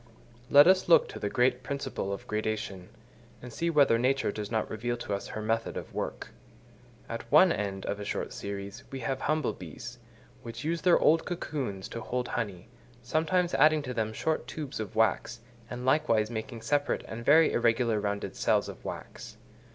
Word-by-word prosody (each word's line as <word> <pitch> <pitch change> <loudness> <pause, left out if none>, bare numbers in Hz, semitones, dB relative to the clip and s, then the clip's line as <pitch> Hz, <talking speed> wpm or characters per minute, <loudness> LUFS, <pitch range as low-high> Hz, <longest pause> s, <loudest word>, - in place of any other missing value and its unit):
Let 145 +1 +8
us 185 +1 +4
look - - +6
to 415 - -8
the - - -2
great 125 0 +2
principle 130 -5 -4
of 100 - -5
gradation, 105 -3 -3 0.5
and 125 -1 -10
see 170 +6 -1
whether 140 -7 +4
Nature 130 -2 +1
does 105 -1 -5
not 110 -1 -1
reveal 120 +2 -3
to 120 -3 -4
us 100 - -3
her 110 - -5
method 115 +1 -1
of - - -7
work. - - -4 0.8
At 115 +1 -7
one 170 +5 +7
end 100 -5 -3
of 105 - -3
a - - -4
short - - -3
series 100 +4 -6
we 135 -1 -6
have 135 +2 -2
humble 155 -7 0
bees, 110 +8 -9 0.4
which 115 0 -7
use 165 +2 -1
their 180 -2 +5
old 160 +1 +3
cocoons 135 - -4
to 115 - -6
hold 125 +2 -3
honey, 100 -7 -4 0.4
sometimes 165 +7 +1
adding 155 +1 +4
to 125 -2 -4
them 110 -2 -1
short 160 +8 -2
tubes 150 -4 -6
of 110 - -5
wax, 115 +2 +1 0.3
and 125 0 -6
likewise 115 -6 +2
making 115 0 -6
separate 145 +4 0
and 115 +1 -6
very 160 +5 +6
irregular 115 -1 +2
rounded 100 0 -3
cells - - +2
of - - -9
wax. - - -8
120 Hz, 180 wpm, -29 LUFS, 110-145 Hz, 0.8 s, Let